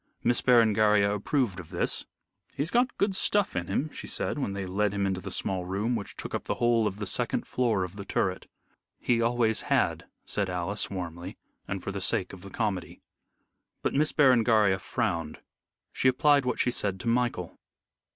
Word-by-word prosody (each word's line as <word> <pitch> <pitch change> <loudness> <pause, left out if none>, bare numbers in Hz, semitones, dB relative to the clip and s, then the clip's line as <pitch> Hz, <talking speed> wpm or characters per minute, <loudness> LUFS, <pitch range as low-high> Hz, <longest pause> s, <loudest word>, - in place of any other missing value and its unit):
Miss 120 0 +3
Berengaria 110 -4 +4
approved 105 -1 -1
of 85 - -10
this. - - -2 0.5
"He's 150 +6 -2
got 245 +1 +1
good 200 0 +1
stuff 205 +1 +1
in 85 -1 -2
him," 145 +10 -1
she - - -7
said, - - -1
when 100 -8 -2
they 100 -1 -4
led 100 +2 0
him 100 -1 0
into 95 -1 -1
the 100 - -6
small 95 0 -1
room, 100 +7 -1
which 105 -3 -5
took - - -6
up - - -3
the - - -1
whole 120 -2 +2
of 100 - -4
the 105 - -4
second 95 - -1
floor 115 -7 0
of 90 +2 -7
the 100 - -5
turret. 95 -1 -1 0.5
"He 120 -1 +1
always 115 -1 +2
had," - - 0 0.2
said 100 -2 -2
Alice, 90 +3 -1
warmly, 90 -1 -6 0.3
and 100 -2 -4
for - - -3
the 100 0 -5
sake 95 0 0
of 95 - -10
the 100 - -10
comedy. 100 -4 -3 0.8
But - - 0
Miss 150 +2 +2
Berengaria 115 -8 +4
frowned. 90 -8 -2 0.5
She - - +1
applied 140 +2 +4
what 125 - -1
she 125 - +2
said 100 -5 -1
to - - -6
Michael. 115 -7 -1
105 Hz, 190 wpm, -28 LUFS, 95-120 Hz, 0.8 s, Berengaria